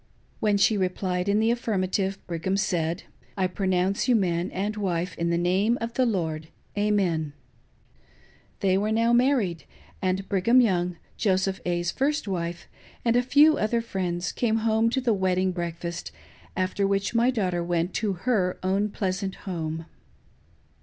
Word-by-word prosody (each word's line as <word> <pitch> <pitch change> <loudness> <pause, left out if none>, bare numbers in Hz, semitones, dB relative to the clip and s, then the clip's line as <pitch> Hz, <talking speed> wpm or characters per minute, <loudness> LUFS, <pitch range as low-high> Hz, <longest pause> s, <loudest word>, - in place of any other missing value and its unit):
When 210 -2 +2
she 205 +2 +3
replied 185 0 -1
in 205 +1 +3
the 225 +1 +3
affirmative, 195 -4 -1
Brigham 175 +3 -2
said, 175 -3 -1 0.2
" - - -32
I 190 - +2
pronounce 185 +2 0
you 250 - +4
man 180 -3 +1
and 205 +3 -2
wife 180 -3 -2
in 170 0 -1
the 170 - +1
name 190 +7 +2
of 230 0 -4
the 255 0 +2
Lord. 160 -7 -2 0.3
Amen." 190 -8 +1 1.3
They 190 -1 +3
were 210 +2 0
now 230 +2 +3
married; 240 - +2 0.4
and 190 +1 -1
Brigham 215 +6 +4
Young, 180 -6 +2 0.2
Joseph 190 -1 +1
A.'s 175 0 0
first 290 -2 0
wife, 170 -3 -3 0.4
and 230 0 +3
a 245 - +5
few 295 +5 +5
other 220 +2 +1
friends 180 -6 -2
came 225 -3 0
home 225 0 +3
to 265 +3 0
the 240 -3 +2
wedding 185 -1 +1
breakfast, 170 0 -5 0.5
after 190 +2 0
which 195 0 0
my 235 +2 +3
daughter 185 -8 0
went 175 +1 -1
to 210 -3 0
her 195 -8 +1
own 195 +3 +1
pleasant 195 -1 -2
home. 165 -3 -4
190 Hz, 155 wpm, -26 LUFS, 180-220 Hz, 1.3 s, a